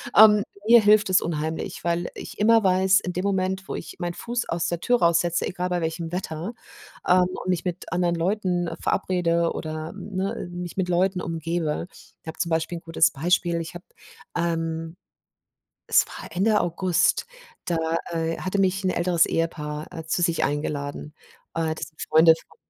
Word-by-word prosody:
ähm, 210 -1 +8 0.2
mir 235 0 +8
hilft 210 0 +5
es 185 - +5
unheimlich, 160 -1 -3
weil 170 0 -1
ich - - -9
immer 225 +1 +4
weiß, 190 0 +4
in 180 - -5
dem 180 - -2
Moment, 190 -1 -1
wo - - -4
ich - - -7
meinen 175 -1 -3
Fuß 240 +6 -4
aus 170 0 -1
der 170 0 -3
Tür 245 +4 +2
raussetze, 170 0 +2
egal 180 0 -3
bei 180 -1 -1
welchem 165 0 -3
Wetter, 175 +2 -4 0.5
ähm, 180 0 +5 0.2
und 185 - -5
mich 180 -1 0
mit 180 0 -4
anderen 175 0 +1
Leuten 180 0 0
verabrede 170 -3 +1
oder, 155 0 -5
ne, 195 -2 -4
mich 175 0 -6
mit 185 -2 0
Leuten 180 +1 +1
umgebe 165 -1 -2 0.3
ich - - -24
habe 160 - -6
zum 170 - -1
Beispiel 165 +2 0
'n - - -9
gutes 165 -1 +3
Beispiel. 170 +3 +1
Ich 165 - -7
habe, 175 +1 -10 0.5
ähm 165 -1 -2 0.9
es - - +4
war - - -9
Ende 210 +4 +3
August, 175 - +1 0.4
da, 170 - 0 0.4
äh, 165 0 -1
hatte 185 +2 -2
mich 195 0 +1
'n 185 - +2
älteres 170 -1 +2
Ehepaar, 150 -2 -2
äh, 165 -2 -7
zu 170 +2 0
sich 170 -2 +1
eingeladen. 145 0 -3 0.4
Äh, 160 -1 0
das - - -5
sind 155 - -19
Freunde 160 +1 +7
von - - -22
175 Hz, 175 wpm, -24 LUFS, 165-185 Hz, 0.9 s, ähm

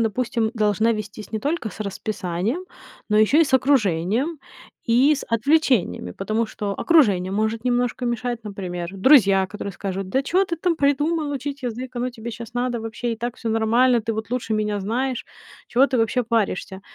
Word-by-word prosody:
допустим, 230 0 0
должна 215 +1 +2
вестись 215 -1 -6
не 220 - -1
только 290 0 -2
с 215 - -12
расписанием, 205 - -3 0.5
но 210 - +4
ещё 215 +8 +4
и 330 - +6
с 265 - 0
окружением, 255 - +2 0.5
и 255 +6 +5
с 285 - -5
отвлечениями, 230 - +1
потому 215 +3 -1
что 205 -2 -4
окружение 200 - +3
может 220 +3 -1
немножко 245 0 0
мешать, 240 -1 -2
например, 180 -4 -5
друзья, 195 -4 +5
которые 200 +1 -6
скажут: 190 +1 -4
"Да 265 - +1
чё 365 +7 +2
ты 340 -2 -3
там 335 0 0
придумал, 295 +2 +1
учить 280 +1 -5
язык? 250 +2 -5
Оно 250 +1 -1
тебе 235 -1 -7
щас 235 +2 -9
надо 245 -1 -1
вообще? 225 +2 -3
И - - -4
так 240 +2 -4
всё 230 - -4
нормально, 230 +3 +3
ты 225 +1 -2
вот 220 0 -5
лучше 245 -3 -1
меня 210 -1 -1
знаешь. 245 +5 -2 0.4
Чего 260 +3 +4
ты 265 - -1
вообще 230 +2 +1
паришься?" 210 -4 -1
230 Hz, 175 wpm, -23 LUFS, 210-260 Hz, 0.5 s, и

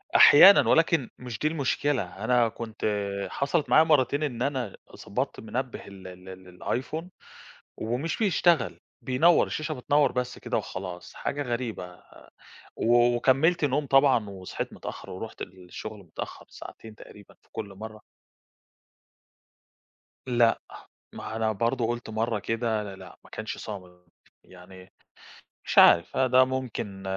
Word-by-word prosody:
أحيانًا، 195 +7 +9
ولكن 165 -4 +3
مش 125 -4 -7
دي 150 - +1
المشكلة، 145 -3 0 0.2
أنا 120 0 +3
كنت 110 0 -7 0.4
حصل 140 +2 0
معايا 155 - +6
مرَّتين 145 -2 +2
إن 130 -6 -3
أنا 130 -7 -2 0.3
ضبَطت - - -3
منبِّه 125 +3 -5
ال 95 -1 -11
ال 90 0 -12 0.4
ال 125 - 0
Iphone 160 +5 -6 0.7
ومش 125 +9 -3
بيشتغَل، 175 - +2 0.2
بينوَّر 160 +7 +4
الشاشة، 155 0 -3
بتنوَّر 145 +1 +2
بس 125 0 -3
كده - - -3
وخلاص، 90 0 -6
حاجة 145 +1 -3
غريبة، 115 -8 -5 0.7
وكمَّلت 125 +8 +3
نوم 145 +1 0
طبعًا 135 -5 +4
وصحِيت 95 -2 -6
متأخِّرة، - - -8
ورُحت 110 +4 -7
للشغل 95 +4 -9
متأخِّر 90 -5 -9
ساعتين 110 -1 -11
تقريبًا 105 -1 -15
في - - -31
كل 100 -2 -6
مرَّة. 110 +2 -9 2.3
لأ، 120 -2 +3 0.5
ما - - -8
هو - - -5
أنا 110 -1 0
برضه 115 +3 0
قُلت 120 0 -4
مرَّة 110 0 -1
كده، 115 0 -1
لأ، 100 -2 -8
لأ - - -13
ما - - -18
كانش 110 0 -6
صامِت 90 -4 -9 0.4
يعني، 90 +1 -15 0.7
مش - - 0
عارِف، 85 - +6
ده 130 0 +5
ممكن 125 -7 -5
120 Hz, 130 wpm, -27 LUFS, 105-135 Hz, 2.3 s, أحيانًا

